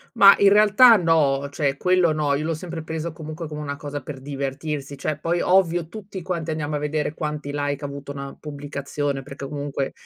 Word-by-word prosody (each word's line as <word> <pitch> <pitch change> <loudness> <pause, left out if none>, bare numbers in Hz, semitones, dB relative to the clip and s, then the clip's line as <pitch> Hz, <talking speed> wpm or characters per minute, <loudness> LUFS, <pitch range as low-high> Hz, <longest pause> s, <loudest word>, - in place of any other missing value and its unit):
Ma 200 -3 +9
in 200 - +6
realtà 215 +3 +7
no, 145 -6 +2
cioè 140 -2 -1
quello 180 -2 +3
no, 150 -2 +1
io 150 +2 -1
l'ho 165 0 -1
sempre 165 0 -6
preso 160 +1 -4
comunque 155 +1 -7
come 150 0 -6
una 140 -1 -4
cosa 145 0 -5
per 135 -3 -8
divertirsi. 140 +1 -4
Cioè, 140 +2 -2
poi 170 +2 0
ovvio, 175 -3 +2
tutti 195 -2 -8
quanti 170 -3 -3
andiamo 150 -1 -2
a - - 0
vedere 150 +1 -2
quanti 150 -2 -4
like 145 0 -2
ha - - 0
avuto 140 0 -7
una 140 -1 -7
pubblicazione 145 -1 -4
perché 140 0 -8
comunque 140 -1 -3
150 Hz, 195 wpm, -23 LUFS, 140-165 Hz, -, Ma